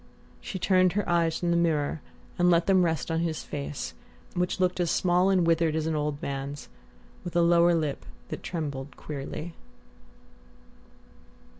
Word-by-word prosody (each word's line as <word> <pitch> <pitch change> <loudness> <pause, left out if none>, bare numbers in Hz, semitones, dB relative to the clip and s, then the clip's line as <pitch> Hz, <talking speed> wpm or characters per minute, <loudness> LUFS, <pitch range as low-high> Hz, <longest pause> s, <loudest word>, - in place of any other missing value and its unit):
She 190 - -6
turned 185 -1 +3
her 205 0 -1
eyes 170 -2 +2
from 175 -1 -1
the - - +3
mirror 155 -3 +1 0.4
and 175 0 +5
let 170 -1 +4
them 190 -2 +4
rest 165 -1 -1
on 165 - +1
his 165 -2 -2
face, 145 0 -5 0.4
which 180 0 -1
looked 180 0 +1
as 175 -2 +1
small 180 +2 +3
and 185 -3 +3
withered 165 -1 +2
as 160 -1 -1
an 160 -1 0
old 150 -1 -1
man's, 140 +1 -5 0.5
with 175 -1 -7
a 170 - +4
lower 170 0 +5
lip 155 -4 -2 0.3
that - - -5
trembled 145 -5 -5
queerly.... 155 +3 -6
170 Hz, 160 wpm, -27 LUFS, 150-175 Hz, 0.5 s, and